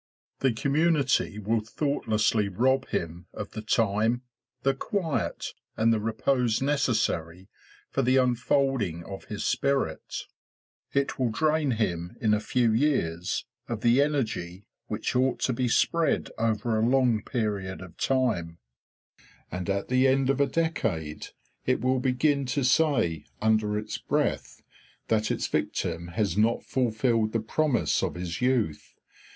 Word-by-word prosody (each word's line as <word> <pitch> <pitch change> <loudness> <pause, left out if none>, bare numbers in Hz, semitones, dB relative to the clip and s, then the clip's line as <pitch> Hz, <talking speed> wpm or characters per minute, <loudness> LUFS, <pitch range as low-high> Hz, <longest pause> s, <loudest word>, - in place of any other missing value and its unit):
The 135 - +3
community 140 -2 +1
will 110 +2 0
thoughtlessly 110 -3 0
rob 130 +7 +1
him 85 +1 -4
of 105 - -6
the 110 - -6
time, 110 +2 +1 0.4
the 135 - +3
quiet, 165 +3 -2 0.2
and 115 +1 +4
the 110 - +1
repose 115 +2 +1
necessary 105 - 0 0.4
for 135 - +1
the 130 +1 +3
unfolding 125 - +1
of 95 +2 -8
his 105 - -5
spirit; 140 -1 -1 0.7
it 140 -1 0
will 125 -2 +2
drain 150 +3 +1
him 90 -5 -2
in 110 -2 +2
a 105 - +3
few 115 +1 +1
years 100 - 0 0.2
of 115 -3 -3
the 120 +4 +4
energy 110 -11 -2 0.2
which - - -3
ought 130 +1 +2
to 130 - +1
be 125 +1 0
spread 165 +7 +1
over 115 0 0
a - - +2
long 125 -4 +3
period 100 -6 -2
of 90 -2 -11
time; 110 -11 0 0.9
and 90 +2 -4
at 100 0 -1
the 130 +1 +3
end 135 0 +3
of 140 +1 0
a 140 - +4
decade 110 - -2 0.4
it 130 - +2
will 130 +1 +1
begin 135 +2 +1
to 135 +2 0
say, 125 - +2
under 110 -1 +2
its 105 - -4
breath, - - -1 0.5
that 110 -1 +2
its - - -1
victim 85 0 -2
has 95 +1 -1
not 110 +3 +2
fulfilled 115 -3 +1
the 115 - +2
promise 135 +5 +1
of - - -2
his 90 +1 -4
youth. 120 - 0
115 Hz, 140 wpm, -27 LUFS, 105-135 Hz, 0.9 s, and